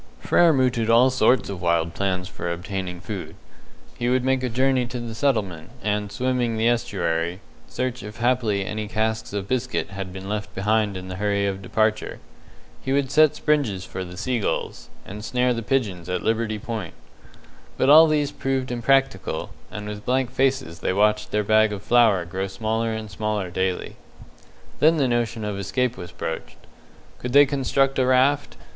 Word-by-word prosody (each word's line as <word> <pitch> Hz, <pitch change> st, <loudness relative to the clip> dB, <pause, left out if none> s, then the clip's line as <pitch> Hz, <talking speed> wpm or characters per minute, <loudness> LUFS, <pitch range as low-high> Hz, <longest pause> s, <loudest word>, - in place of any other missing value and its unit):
Frere 170 Hz, -, +4 dB
mooted 125 Hz, -5 st, +1 dB
all 120 Hz, +3 st, +6 dB
sorts 130 Hz, -3 st, +3 dB
of 95 Hz, -3 st, -6 dB
wild 85 Hz, -1 st, +1 dB
plans 95 Hz, -1 st, -1 dB
for 85 Hz, -2 st, -5 dB
obtaining 90 Hz, 0 st, -4 dB
food. 100 Hz, -3 st, -6 dB, 0.6 s
He 120 Hz, -, 0 dB
would 130 Hz, 0 st, +2 dB
make 130 Hz, 0 st, +1 dB
a 130 Hz, -, -1 dB
journey 130 Hz, +1 st, +1 dB
to 125 Hz, 0 st, -5 dB
the 120 Hz, -1 st, -6 dB
settlement, 100 Hz, -, -1 dB
and, 105 Hz, 0 st, -1 dB
swimming 125 Hz, 0 st, 0 dB
the 110 Hz, +1 st, +2 dB
estuary, 85 Hz, -6 st, 0 dB, 0.3 s
search 130 Hz, 0 st, -3 dB
if 105 Hz, +2 st, -9 dB
haply 115 Hz, -5 st, +1 dB
any 105 Hz, +2 st, -4 dB
casks 110 Hz, +1 st, -2 dB
of 100 Hz, -1 st, -4 dB
biscuit 130 Hz, -2 st, -2 dB
had 95 Hz, -1 st, -6 dB
been 95 Hz, +1 st, -8 dB
left 105 Hz, 0 st, -4 dB
behind 105 Hz, 0 st, +1 dB
in 95 Hz, 0 st, -7 dB
the 95 Hz, 0 st, -6 dB
hurry 100 Hz, 0 st, 0 dB
of 95 Hz, -1 st, -2 dB
departure. 110 Hz, +2 st, 0 dB, 0.6 s
He 135 Hz, -, -3 dB
would 140 Hz, -1 st, +1 dB
set 155 Hz, 0 st, +5 dB
springes 140 Hz, -, 0 dB
for 95 Hz, -, -5 dB
the 90 Hz, 0 st, -9 dB
seagulls, 115 Hz, +1 st, -2 dB, 0.2 s
and 105 Hz, +2 st, -8 dB
snare 125 Hz, +1 st, +1 dB
the 115 Hz, -, -3 dB
pigeons 105 Hz, -, -1 dB
at 90 Hz, -, -2 dB
Liberty 110 Hz, -1 st, 0 dB
Point. 105 Hz, -5 st, -5 dB, 0.8 s
But -, -, +2 dB
all 160 Hz, +2 st, +9 dB
these 150 Hz, -2 st, +1 dB
proved 135 Hz, -2 st, -2 dB
impracticable, 120 Hz, -8 st, 0 dB, 0.2 s
and 105 Hz, -1 st, -7 dB
with 105 Hz, 0 st, -6 dB
blank 130 Hz, -1 st, 0 dB
faces 130 Hz, -11 st, 0 dB
they -, -, -1 dB
watched 105 Hz, +2 st, +2 dB
their 105 Hz, 0 st, 0 dB
bag 110 Hz, +1 st, +4 dB
of 105 Hz, -1 st, -6 dB
flour 110 Hz, -7 st, +4 dB
grow 95 Hz, +3 st, -3 dB
smaller 110 Hz, +3 st, -2 dB
and 110 Hz, -1 st, -5 dB
smaller 105 Hz, -1 st, -2 dB
daily. 95 Hz, 0 st, -2 dB, 0.8 s
Then 160 Hz, +2 st, +5 dB
the 140 Hz, -3 st, +2 dB
notion 120 Hz, -2 st, -1 dB
of 105 Hz, -1 st, -3 dB
escape 125 Hz, +5 st, -1 dB
was 90 Hz, -2 st, -9 dB
broached. 80 Hz, -2 st, -6 dB, 0.6 s
Could 125 Hz, 0 st, -5 dB
they 145 Hz, +1 st, +8 dB
construct 135 Hz, 0 st, +1 dB
a 130 Hz, -, +3 dB
raft? 130 Hz, -, +2 dB
110 Hz, 175 wpm, -23 LUFS, 95-130 Hz, 0.8 s, all